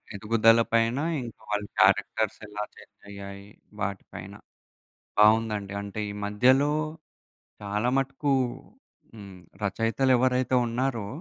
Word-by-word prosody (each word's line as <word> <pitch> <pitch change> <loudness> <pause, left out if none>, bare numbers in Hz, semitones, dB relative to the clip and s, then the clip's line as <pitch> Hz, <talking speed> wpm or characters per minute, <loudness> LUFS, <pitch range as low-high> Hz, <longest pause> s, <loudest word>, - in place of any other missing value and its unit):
ఎదుగుదల 115 +2 +4
పైన 115 +3 +2 0.2
ఇంకా 115 - -10
వాళ్ళ 105 0 -1
క్యారెక్టర్స్ 110 -1 +2
ఎలా 105 0 -4
చేంజ్ - - -17
అయ్యాయి 100 0 -9 0.3
వాటి 100 -1 -3
పైన. - - -8 0.9
బావుందండి. 105 -2 +3
అంటే 100 +1 -6
ఈ - - -5
మధ్యలో 130 +8 +3 0.9
చాలా 105 +4 -1
మటుకు 135 +1 -1 0.8
హ్మ్. 100 -4 -11 0.2
రచయితలెవరైతే 125 +4 +2
ఉన్నారో 120 -2 -1
110 Hz, 100 wpm, -27 LUFS, 100-125 Hz, 0.9 s, ఎదుగుదల